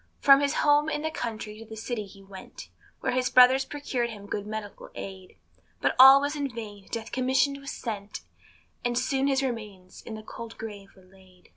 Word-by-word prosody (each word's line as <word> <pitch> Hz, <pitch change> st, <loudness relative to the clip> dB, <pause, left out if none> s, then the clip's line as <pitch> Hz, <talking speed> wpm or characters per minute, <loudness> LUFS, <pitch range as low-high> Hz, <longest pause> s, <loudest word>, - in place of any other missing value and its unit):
From 275 Hz, -1 st, +7 dB
his 285 Hz, +1 st, 0 dB
home 295 Hz, +1 st, +3 dB
in 300 Hz, -1 st, -3 dB
the 315 Hz, -, -1 dB
country 215 Hz, -6 st, -5 dB
to 225 Hz, -, -10 dB
the 220 Hz, 0 st, -10 dB
city 220 Hz, -1 st, -4 dB
he 195 Hz, 0 st, -15 dB
went, 195 Hz, -1 st, -11 dB, 0.3 s
Where -, -, 0 dB
kind 255 Hz, 0 st, 0 dB
brothers 255 Hz, +2 st, +7 dB
procured 260 Hz, -5 st, -3 dB
him 205 Hz, -3 st, -9 dB
good 205 Hz, 0 st, -4 dB
medical 215 Hz, -1 st, -7 dB
aid; 190 Hz, -1 st, -9 dB, 0.4 s
But -, -, +1 dB
all 265 Hz, +1 st, +10 dB
was 285 Hz, +2 st, -2 dB
in 285 Hz, -2 st, -2 dB
vain 210 Hz, -5 st, -9 dB
Death 230 Hz, -1 st, -5 dB
commissioned 265 Hz, +2 st, +1 dB
was 275 Hz, 0 st, -8 dB
sent, 210 Hz, -3 st, -6 dB, 0.6 s
And 240 Hz, 0 st, 0 dB
soon 270 Hz, 0 st, +1 dB
his 270 Hz, -1 st, +1 dB
remains 210 Hz, -7 st, -6 dB
in 220 Hz, -, -8 dB
the 215 Hz, -, -9 dB
cold 230 Hz, +1 st, -9 dB
grave 205 Hz, -3 st, -8 dB
were 190 Hz, -, -19 dB
laid. 185 Hz, -1 st, -22 dB
230 Hz, 195 wpm, -27 LUFS, 205-270 Hz, 0.6 s, all